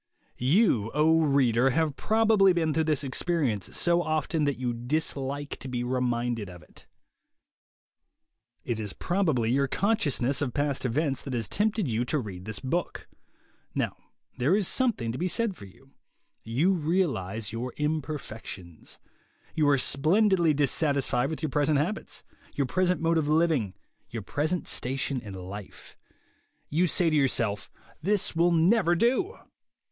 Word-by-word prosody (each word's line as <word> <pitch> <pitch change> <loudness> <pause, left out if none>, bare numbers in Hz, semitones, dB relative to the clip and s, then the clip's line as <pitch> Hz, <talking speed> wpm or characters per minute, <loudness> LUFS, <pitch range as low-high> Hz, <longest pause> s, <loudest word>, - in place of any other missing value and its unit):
You, 130 - +3
O 160 +2 +4
reader, 135 -4 +3
have 150 +1 0
probably 215 -2 +3
been 160 -3 0
through 160 0 +1
this 150 -2 +1
experience, 135 - -1
so 175 0 +2
often 155 -1 -1
that 140 -1 0
you 125 -1 -2
dislike 140 +2 -2
to - - -8
be 125 -1 -3
reminded 120 -4 -1
of 90 -3 -12
it. - - -17 1.8
It 115 -2 -2
is 105 -3 -5
probably 155 - 0
your 140 +2 +2
consciousness 145 - +1
of 130 -5 -2
past 145 -2 0
events 135 +3 0
that 135 -3 -5
has 115 -2 -1
tempted 210 -3 0
you 115 0 0
to 150 - 0
read 95 -8 -6
this 110 -1 -2
book. 165 +7 -3 0.7
Now - - -1 0.4
there 140 +10 +3
is 205 -3 +2
something 225 - +1
to 125 - -6
be 180 - 0
said 205 +3 0
for 100 - -11
you. 135 +8 -19 0.5
You 135 +12 +1
realize 135 - -1
your 120 +3 -4
imperfections. 145 - -5 0.6
You 150 -3 +2
are 140 - +4
splendidly 170 +6 +3
dissatisfied 140 -3 +1
with 160 +1 -6
your 155 - -1
present 150 +1 +2
habits, 180 +10 -3 0.3
your 140 - +1
present 180 +5 0
mode 165 0 +2
of 150 - -1
living, 155 - +1 0.3
your 115 -3 -6
present 155 - -2
station 135 0 -1
in 100 -3 -9
life. 95 +2 -9 0.8
You 170 +5 +2
say 170 0 +1
to - - +1
yourself, 115 -8 +1 0.3
"This 200 +1 0
will 170 +2 +3
never 175 +2 +3
do." 260 - +1
145 Hz, 150 wpm, -27 LUFS, 120-170 Hz, 1.8 s, O